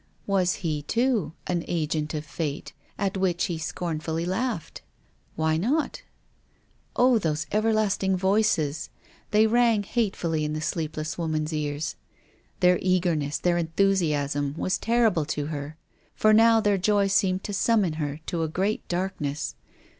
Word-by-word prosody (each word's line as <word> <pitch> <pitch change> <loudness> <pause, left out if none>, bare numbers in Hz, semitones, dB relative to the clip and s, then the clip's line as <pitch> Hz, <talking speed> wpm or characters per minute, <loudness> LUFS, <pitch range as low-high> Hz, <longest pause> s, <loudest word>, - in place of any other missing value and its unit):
Was 185 -3 +2
he, 155 -2 -1
too, 225 - 0
an 175 -2 -1
agent 155 -2 -1
of 150 0 -4
Fate, 150 -3 -4 0.2
at 195 -1 -1
which 185 -2 +1
he 170 -4 -3
scorn 165 0 -3
fully 160 +1 -3
laughed? 190 -1 -3 0.5
Why 160 0 +1
not? 275 - 0 0.9
Oh, 250 -1 +4
those 155 -4 -1
everlasting 215 -3 +1
voices! 190 -6 +1 0.4
they 215 +1 +4
rang 230 -2 +3
hate 215 -1 -1
fully 160 -2 -1
in 150 0 -2
the 155 - -2
sleepless 155 0 -3
woman's 155 -1 -1
ears. 150 0 -3 0.6
Their 180 0 +5
eager 185 -2 +2
ness, 145 -1 -2
their 175 -1 +1
enthusiasm, 155 -5 +1
were 185 - -2
terrible 220 -5 +2
to 145 -1 -2
her. 145 +1 -6 0.4
For 215 0 +4
now 225 +1 +6
their 205 -2 +2
joy 205 +1 +3
seemed 190 -1 +1
to 205 - -4
summon 200 -5 +2
her 145 +1 -3
to 170 - -2
a 160 - 0
great 190 +7 -1
darkness. 175 -6 -2
175 Hz, 145 wpm, -26 LUFS, 155-205 Hz, 0.9 s, now